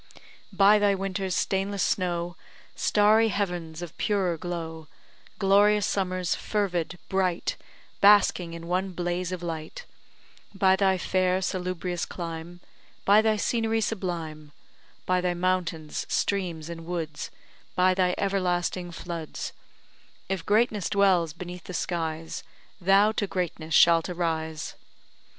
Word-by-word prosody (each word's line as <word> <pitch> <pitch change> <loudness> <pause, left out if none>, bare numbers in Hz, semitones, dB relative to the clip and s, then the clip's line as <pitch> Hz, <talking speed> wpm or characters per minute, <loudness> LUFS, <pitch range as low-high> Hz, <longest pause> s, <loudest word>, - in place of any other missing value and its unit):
By 200 +2 +5
thy 205 -1 +3
winter's 195 -1 -2
stainless 195 0 0
snow, 175 -2 -1 0.4
Starry 215 +2 +4
heavens 175 -5 -3
of 170 -1 -8
purer 195 -5 +1
glow, 165 -2 -5 0.5
Glorious 205 +1 +4
summers, 185 -2 0
fervid, 180 -5 -2
bright, 185 -3 0 0.4
Basking 200 -4 +5
in 165 0 -8
one 185 +2 -1
blaze 175 +1 -2
of 180 -1 -5
light; 160 -2 -5 0.7
By 190 -1 +4
thy 190 -1 +2
fair, 185 0 +1
salubrious 180 -1 -2
clime; 170 0 -7 0.4
By 205 +2 +6
thy 220 0 +2
scenery 225 +1 0
sublime; 165 -8 -4 0.5
By 185 0 +2
thy 180 -1 0
mountains, 175 -4 -1
streams, 175 -6 -1
and 165 -1 -8
woods; 165 -4 -4 0.5
By 185 +1 +4
thy 180 -1 +1
everlasting 180 -2 -1
floods; 170 -2 -6 0.7
If 190 -3 -2
greatness 210 -2 +2
dwells 190 -5 +3
beneath 175 +2 -8
the 185 - -6
skies, 165 -2 -3 0.4
Thou 195 +4 +5
to 210 -2 -1
greatness 165 -4 -2
shalt 170 0 +6
arise! 160 -3 -2
180 Hz, 120 wpm, -27 LUFS, 170-195 Hz, 0.7 s, By